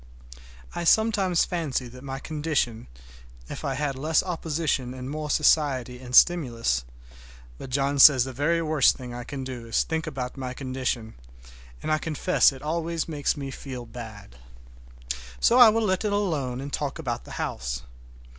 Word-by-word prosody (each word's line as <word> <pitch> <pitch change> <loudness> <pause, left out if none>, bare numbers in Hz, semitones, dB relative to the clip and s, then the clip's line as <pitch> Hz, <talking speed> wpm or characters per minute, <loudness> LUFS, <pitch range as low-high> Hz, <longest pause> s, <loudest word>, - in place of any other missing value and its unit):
I - - -3
sometimes 195 -2 +3
fancy 150 -8 -2
that 125 +1 -12
in 135 - -13
my 135 -1 -4
condition 145 -6 -2 0.6
if - - -7
I 135 - -1
had 140 0 -2
less 155 +4 +1
opposition 160 -7 -2
and 130 0 -7
more 150 +2 -4
society 135 -5 +2
and 125 0 -4
stimulus—but - - 0
John 140 +2 0
says 135 -2 +9
the 130 0 -6
very 165 +6 +1
worst 155 -4 +3
thing 125 -2 -8
I 120 0 -6
can 135 +2 -6
do 125 -3 -7
is 115 - +1
to - - -18
think 160 0 -2
about 130 -3 -5
my 130 -1 -5
condition, 130 -4 -3 0.7
and - - -2
I 155 - +2
confess 160 +2 +2
it 135 0 -11
always 165 +1 -2
makes 150 -3 -1
me 135 -1 -5
feel 130 -2 -7
bad. 110 - -10 1.0
So 245 - +4
I 240 -3 +10
will 225 +1 +1
let 185 -1 0
it 210 - 0
alone 150 -11 -1
and 140 +1 -7
talk 145 0 -2
about 125 -8 -4
the - - -10
house. - - -3
135 Hz, 170 wpm, -26 LUFS, 125-160 Hz, 1.0 s, I